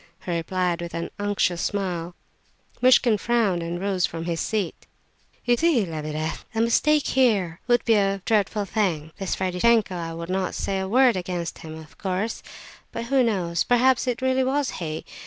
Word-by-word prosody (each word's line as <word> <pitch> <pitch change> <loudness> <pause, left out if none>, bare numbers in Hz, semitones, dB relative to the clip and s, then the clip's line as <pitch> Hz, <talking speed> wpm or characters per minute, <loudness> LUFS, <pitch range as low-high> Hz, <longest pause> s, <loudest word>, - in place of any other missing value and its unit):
he 180 - -3
replied, 175 +1 -1
with 170 0 -6
an 170 - -4
unctuous 205 -4 0
smile. 180 -4 -2 0.7
Muishkin 245 -4 +5
frowned, 220 -7 +1
and 170 +1 -4
rose 190 -1 -1
from 165 0 -6
his 170 -1 -2
seat. 205 -6 -3 0.6
"You 245 - +4
see, 290 - +2
Lebedeff, 155 -1 -4
a 225 - +2
mistake 295 +6 +3
here 205 -10 +2
would 240 -1 +3
be 230 - +4
a 195 -2 +1
dreadful 210 -1 +1
thing. 175 -8 -1
This 195 -2 -2
Ferdishenko, 190 +3 +2
I 165 -1 -4
would 170 0 -6
not 190 -1 -1
say 195 -1 -2
a 190 - -2
word 255 +1 +5
against 175 -2 -4
him, 160 0 -8
of 155 -1 -14
course; 195 +4 -2 0.5
but, 230 - -4
who 265 +2 +3
knows? 180 -8 0
Perhaps 250 +1 +3
it 250 +1 -2
really 260 0 +2
was 275 +1 0
he? 155 -1 -4
195 Hz, 175 wpm, -24 LUFS, 170-235 Hz, 0.7 s, Muishkin